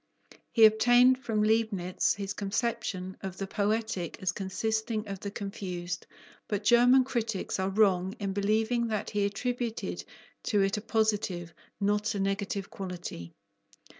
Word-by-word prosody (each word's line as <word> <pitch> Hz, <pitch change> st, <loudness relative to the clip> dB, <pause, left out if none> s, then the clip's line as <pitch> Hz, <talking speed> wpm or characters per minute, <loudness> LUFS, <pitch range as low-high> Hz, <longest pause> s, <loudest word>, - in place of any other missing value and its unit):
He 225 Hz, -2 st, +7 dB
obtained 245 Hz, +4 st, +5 dB
from 220 Hz, -5 st, 0 dB
Leibnitz 215 Hz, -5 st, +1 dB
his 200 Hz, -1 st, -4 dB
conception 195 Hz, -3 st, -2 dB
of 190 Hz, -1 st, -6 dB
the 195 Hz, -, -3 dB
poetic 205 Hz, -3 st, -1 dB
as 185 Hz, -2 st, 0 dB
consisting 220 Hz, +3 st, -2 dB
of 195 Hz, -1 st, -5 dB
the 200 Hz, -, -5 dB
confused, 180 Hz, -4 st, -5 dB, 0.4 s
but 205 Hz, -1 st, -2 dB
German 245 Hz, +4 st, +6 dB
critics 225 Hz, -8 st, -2 dB
are 190 Hz, 0 st, 0 dB
wrong 195 Hz, -1 st, +2 dB
in 200 Hz, -2 st, -2 dB
believing 220 Hz, +4 st, +1 dB
that 215 Hz, -2 st, -2 dB
he 205 Hz, -1 st, +1 dB
attributed 235 Hz, +3 st, -3 dB, 0.4 s
to 205 Hz, -4 st, +2 dB
it 195 Hz, 0 st, +1 dB
a -, -, -3 dB
positive, 210 Hz, -6 st, 0 dB, 0.3 s
not 205 Hz, +1 st, +1 dB
a -, -, -2 dB
negative 195 Hz, 0 st, -2 dB
quality. 175 Hz, -, -7 dB
205 Hz, 135 wpm, -29 LUFS, 195-220 Hz, 0.4 s, He